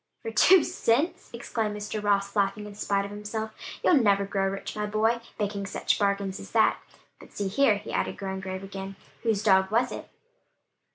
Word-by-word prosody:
"For 225 - -4
two 355 - +6
cents!" 275 +8 0
exclaimed 225 -3 -3
Mr. 210 +1 -4
Ross 200 -1 +1
laughing 200 +1 0
in 210 - -9
spite 200 -1 -1
of 200 - -8
himself. 215 +1 -4 0.3
"You'll - - +5
never 200 -5 +3
grow 195 -1 0
rich, 195 0 -5
my 210 0 -2
boy, 220 +3 +1 0.2
making 200 -1 -2
such - - 0
bargains 200 -1 0
as - - -10
that. - - +4 0.4
But - - -15
see 200 - -2
here," 215 +3 +3
he 200 - -8
added, - - -1
growing 190 -1 -4
grave 190 0 -5
again, 195 0 -7 0.3
"whose 220 -3 0
dog 190 -2 +4
was 235 +4 +1
it?" - - -7
205 Hz, 185 wpm, -27 LUFS, 195-220 Hz, 0.4 s, two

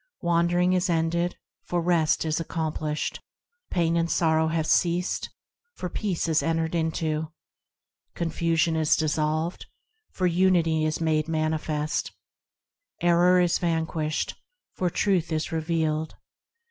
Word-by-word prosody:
Wandering 175 +1 +2
is 185 0 +1
ended, 170 +1 0 0.2
for 175 - -2
Rest 165 -2 +2
is 155 0 0
accomplished; 155 -2 -3 0.5
Pain 170 -1 +1
and 170 0 +1
sorrow 160 -2 +2
have 160 -1 0
ceased, 175 +2 +1 0.5
for 180 - -4
Peace 185 -3 -2
is 160 -1 +2
entered 165 0 -1
into; 160 -1 -1 0.8
Confusion 165 0 0
is 155 -1 +3
dissolved, 155 +2 -1 0.4
for 185 - -2
Unity 170 -3 +3
is 155 +1 -1
made 155 -1 +1
manifest; 155 -1 -1 0.9
Error 175 +1 +4
is 175 -1 +2
vanquished, 160 -2 -1 0.4
for 180 - -1
Truth 180 -2 0
is 160 +2 -2
revealed. 160 -1 -1
165 Hz, 115 wpm, -26 LUFS, 160-175 Hz, 0.9 s, Error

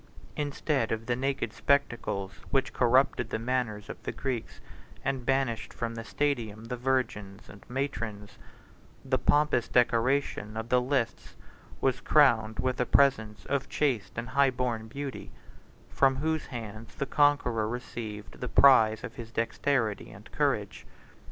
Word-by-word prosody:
57 150 - -1
Instead 140 -4 -1
of 110 0 -2
the 120 - 0
naked 135 +2 -2
spectacles 120 -8 0 0.2
which 135 -1 0
corrupted 125 0 +3
the - - -1
manners 115 -4 -2
of - - -8
the - - -4
Greeks, 125 -4 -4 0.5
and 135 -3 -2
banished 135 -4 0
from 115 -1 -4
the 115 0 -6
stadium 115 -5 -2
the 125 - -4
virgins 120 -6 -2
and 100 - -13
matrons, 115 -6 -4 0.7
the 130 -1 +1
pompous 145 -5 +2
decoration 120 -2 +1
of 115 +1 -4
the 125 0 +4
lists 125 -2 -2 0.5
was 130 -2 +1
crowned 115 -7 +4
with 130 0 -1
the 125 - +1
presence 110 -7 +2
of 140 -2 -2
chaste 130 -8 0
and 120 0 -4
high 140 +3 +4
born 125 -3 -2
beauty, 140 +3 -6 0.6
from 135 -1 +3
whose 160 +3 -1
hands 115 -3 -8
the 140 - -2
conqueror 135 -6 +2
received 110 -3 -6
the 125 - -3
prize 110 -6 +6
of - - -6
his 115 -2 -7
dexterity 115 -1 -1
and - - -14
courage. - - -1
125 Hz, 145 wpm, -29 LUFS, 110-135 Hz, 0.7 s, prize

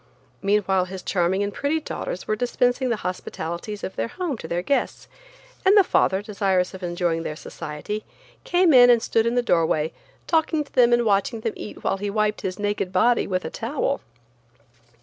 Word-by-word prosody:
Meanwhile 195 -2 +2
his 185 0 -8
charming 185 +2 +1
and 200 0 -3
pretty 295 +3 0
daughters 290 - -5
were 215 - +1
dispensing 245 +2 0
the 235 - +1
hospitalities 180 +2 -5
of - - -5
their - - -1
home 345 +2 -3
to - - -7
their 175 +1 -2
guests, 280 - -1 0.6
and 390 +2 +5
the 405 - +8
father, 195 - +2
desirous 195 -4 0
of 190 - -9
enjoying 175 -2 -1
their 155 -2 -4
society, 165 +7 -6 0.4
came 355 -3 +3
and 245 -2 +7
stood 225 0 +1
in 235 - 0
the 245 - +2
doorway, 160 -6 +1 0.3
talking 320 -1 +1
to 285 - -23
them 245 -2 +5
and 240 0 +3
watching 205 +2 +1
them 225 -1 -2
eat - - -9
while 195 - 0
he 205 +1 -3
wiped 215 0 0
his 185 -1 -3
naked 205 -3 -2
body 235 +6 +3
with 185 -2 -2
a - - -4
towel! - - -2
205 Hz, 185 wpm, -24 LUFS, 185-245 Hz, 0.6 s, the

